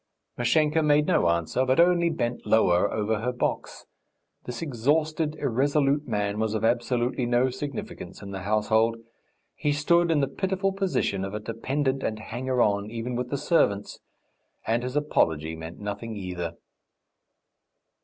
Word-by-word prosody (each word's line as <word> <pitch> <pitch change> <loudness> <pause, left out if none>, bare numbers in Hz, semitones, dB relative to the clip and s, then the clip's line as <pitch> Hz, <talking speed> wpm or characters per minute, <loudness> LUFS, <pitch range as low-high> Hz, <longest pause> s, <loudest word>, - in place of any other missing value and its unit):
Mashenka 150 +6 +2
made 150 -1 +3
no 85 - +3
answer, 85 +9 +1
but 130 +2 +2
only 170 0 +4
bent 120 -7 -2
lower 95 -3 +3
over 110 0 0
her 125 +2 -1
box. 125 - -3 0.6
This 125 +4 -5
exhausted, 150 +3 0
irresolute 140 +2 +1
man 105 -2 -1
was 110 0 0
of 110 +1 0
absolutely 120 +1 0
no 125 +2 +2
significance 140 0 -6
in 100 - -7
the 95 -1 -5
household. 110 +3 +2 0.6
He 150 - -1
stood 170 +4 +3
in 160 -2 +3
the 140 - +2
pitiful 190 +3 -1
position 190 - -1
of 100 +2 -4
a - - -2
dependent 130 +5 -2
and 110 - -2
hanger 125 +3 -1
on, 100 0 0
even 115 +2 -4
with 125 0 -3
the 140 - -1
servants, 135 - +1 0.7
and 115 +2 +1
his 125 +2 -4
apology 80 - +1
meant 80 +1 -8
nothing 105 +2 -5
either. 90 -4 -5
120 Hz, 150 wpm, -26 LUFS, 105-145 Hz, 0.7 s, only